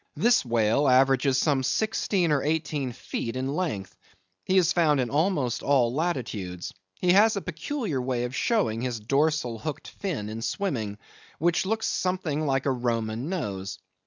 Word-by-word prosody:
This 235 +1 +3
whale 115 +3 +2
averages 135 +1 +4
some 140 -1 +2
sixteen 185 - 0
or 145 -2 +2
eighteen 150 -3 -1
feet 115 0 -5
in 130 +2 -2
length. 125 - -3 0.5
He 190 - +2
is 180 -2 +4
found 155 -5 +3
in 125 -2 -1
almost 145 - +1
all 130 -4 +2
latitudes. 120 - -3 0.3
He 180 - +3
has 215 +3 +5
a - - 0
peculiar 180 - -3
way 125 -1 -1
of 125 +2 -4
showing 195 - +1
his 125 -2 -2
dorsal 135 0 0
hooked 150 +1 -5
fin 170 - -4
in 110 +1 -5
swimming, 115 - -2 0.4
which 170 +4 +1
looks 220 +2 0
something 160 -5 -1
like 135 -1 +1
a 140 - +2
Roman 120 +1 -2
nose. 100 - -3
135 Hz, 160 wpm, -26 LUFS, 120-170 Hz, 0.5 s, has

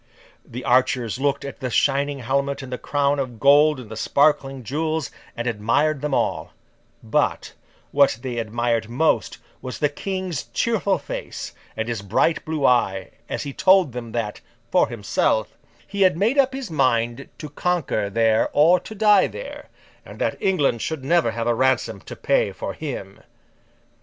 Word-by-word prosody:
The 125 +2 -8
archers 125 -1 +2
looked 140 0 0
at 140 - -7
the 130 - -3
shining 140 +2 +1
helmet 140 +3 -1
and 130 -1 -7
the 125 - -4
crown 145 0 0
of 125 -4 -4
gold 145 +1 +5
and 115 -4 -11
the - - -5
sparkling 135 +2 +1
jewels, 155 +1 -2 0.3
and 120 - -3
admired 120 +6 +1
them 150 - -2
all; - - -1 0.5
but, - - 0 0.4
what 140 -5 +4
they 125 -3 -3
admired 115 0 -1
most 145 +7 +1 0.2
was 130 -1 -6
the 150 - +1
King's 185 -1 -4
cheerful 205 -4 0
face, 145 - -6 0.2
and 110 0 -2
his 115 -4 -3
bright 105 +11 +1
blue 155 -3 -1
eye, 95 -6 +2 0.2
as - - -3
he 140 - -6
told 185 -4 +4
them 120 -2 -6
that, 115 -3 -3 0.3
for - - +4
himself, 110 -1 0 0.3
he 200 -1 -5
had 185 -4 +4
made 230 +9 +2
up 270 -1 +4
his 270 -9 -6
mind 120 -3 0
to 155 - -7
conquer 145 - -1
there 110 +1 +2
or 165 +5 +5
to 215 +5 -10
die 210 -2 +5
there, - - -9 0.3
and - - -12
that - - -1
England 145 - +1
should 160 -4 -3
never 170 -4 +3
have 115 0 -3
a 120 - +2
ransom 130 +2 +1
to - - -9
pay - - +1
for - - -5
him. - - -6
140 Hz, 165 wpm, -22 LUFS, 120-160 Hz, 0.5 s, gold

